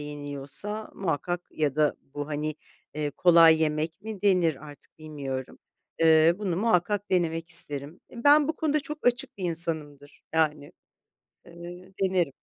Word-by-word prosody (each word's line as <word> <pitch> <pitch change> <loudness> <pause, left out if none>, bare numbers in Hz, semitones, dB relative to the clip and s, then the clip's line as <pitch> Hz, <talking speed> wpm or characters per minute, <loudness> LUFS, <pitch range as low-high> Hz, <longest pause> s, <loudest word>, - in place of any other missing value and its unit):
yeniyorsa 145 +8 -5
muhakkak 175 0 -2
ya 150 -2 -1
da 150 -1 +2 0.2
bu, 145 +1 -4
hani, 150 0 -3 0.4
eee, 150 -1 -2
kolay 165 0 +6
yemek 155 +3 -1
mi 215 -3 -7
denir 175 -7 +2
artık, 145 +1 -15
bilmiyorum. 140 -4 -6 0.4
Eee, 160 +1 +6
bunu 190 -5 -2
muhakkak 205 0 +1
denemek 165 -2 0
isterim. 145 -1 0
Eee, 235 -1 -10
ben 290 +1 +6
bu 320 - -2
konuda 305 -1 0
çok 300 -1 -7
açık 245 -1 0
bir 190 - -4
insanımdır. 155 -4 -4
Yani, 150 -3 0 0.7
eee, 175 +2 -11
denerim. 180 -7 +1
165 Hz, 140 wpm, -27 LUFS, 150-190 Hz, 0.7 s, kolay